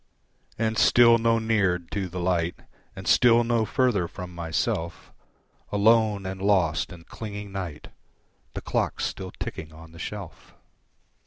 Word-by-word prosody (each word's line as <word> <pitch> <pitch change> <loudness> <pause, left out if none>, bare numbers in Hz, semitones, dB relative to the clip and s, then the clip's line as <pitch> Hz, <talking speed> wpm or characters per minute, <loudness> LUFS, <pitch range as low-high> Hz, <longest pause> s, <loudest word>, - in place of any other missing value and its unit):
And 110 -1 0
still 115 -1 +6
no 115 0 +3
neared 95 -6 0
to 95 -3 -2
the 90 +1 -5
Light, 85 -1 0 0.4
And - - -8
still 120 -1 +5
no 115 -1 +1
further 110 -8 +1
from 90 +1 -8
myself, 80 0 -3 0.6
Alone 105 -1 +3
and 95 0 -5
lost 95 -6 +2
in 85 -2 -11
clinging 100 +1 -7
night 90 -6 -6 0.7
(The - - -4
clock's - - -1
still 65 +10 -5
ticking 80 -3 -7
on 80 +1 -13
the 85 - -13
shelf). 100 -1 -8
95 Hz, 140 wpm, -26 LUFS, 85-110 Hz, 0.7 s, still